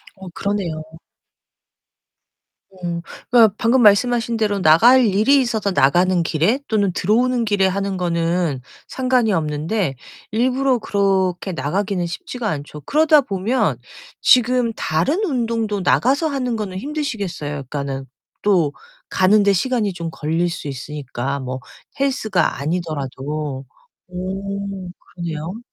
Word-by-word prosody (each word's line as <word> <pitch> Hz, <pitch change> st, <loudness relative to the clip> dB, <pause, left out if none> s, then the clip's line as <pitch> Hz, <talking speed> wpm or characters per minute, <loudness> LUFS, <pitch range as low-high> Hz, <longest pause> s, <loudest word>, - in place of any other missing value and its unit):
어 190 Hz, -1 st, -10 dB
그러네요. 175 Hz, -4 st, -3 dB, 2.0 s
음. 170 Hz, -1 st, -2 dB, 0.3 s
그러니까 225 Hz, -5 st, +6 dB
방금 240 Hz, +2 st, +3 dB
말씀하신 235 Hz, +2 st, +3 dB
대로 205 Hz, -2 st, 0 dB
나갈 235 Hz, +12 st, +6 dB
일이 220 Hz, +8 st, +4 dB
있어서 220 Hz, -5 st, -1 dB
나가는 175 Hz, +5 st, +3 dB
길에 170 Hz, -, +1 dB
또는 205 Hz, -4 st, +1 dB
들어오는 235 Hz, +6 st, +1 dB
길에 205 Hz, -2 st, +2 dB
하는 195 Hz, 0 st, -1 dB
거는 170 Hz, -4 st, 0 dB, 0.3 s
상관이 255 Hz, -5 st, +1 dB
없는데 155 Hz, +1 st, -1 dB, 0.4 s
일부러 255 Hz, +3 st, +2 dB
그렇게 195 Hz, -3 st, 0 dB
나가기는 180 Hz, +5 st, -1 dB
쉽지가 215 Hz, +7 st, -5 dB
않죠. 150 Hz, 0 st, -6 dB
그러다 305 Hz, -, +4 dB
보면 220 Hz, +3 st, 0 dB, 0.4 s
지금 250 Hz, -1 st, +4 dB
다른 215 Hz, -, 0 dB
운동도 230 Hz, -, -1 dB
나가서 275 Hz, -, +2 dB
하는 255 Hz, -5 st, -2 dB
거는 195 Hz, -4 st, -4 dB
힘드시겠어요. 220 Hz, -, -4 dB, 0.2 s
그러니까는 140 Hz, -2 st, -4 dB, 0.4 s
또 175 Hz, -8 st, +3 dB, 0.4 s
가는데 200 Hz, +2 st, +4 dB
시간이 215 Hz, -1 st, 0 dB
좀 170 Hz, -1 st, -5 dB
걸릴 165 Hz, +4 st, -1 dB
수 165 Hz, -3 st, -6 dB
있으니까 140 Hz, 0 st, -4 dB
뭐 130 Hz, 0 st, -5 dB, 0.4 s
헬스가 220 Hz, -, 0 dB
아니더라도. 145 Hz, -3 st, -3 dB, 0.5 s
음 195 Hz, 0 st, -5 dB, 0.2 s
그래요? 170 Hz, +4 st, -5 dB
195 Hz, 280 characters per minute, -20 LUFS, 165-230 Hz, 2.0 s, 그러니까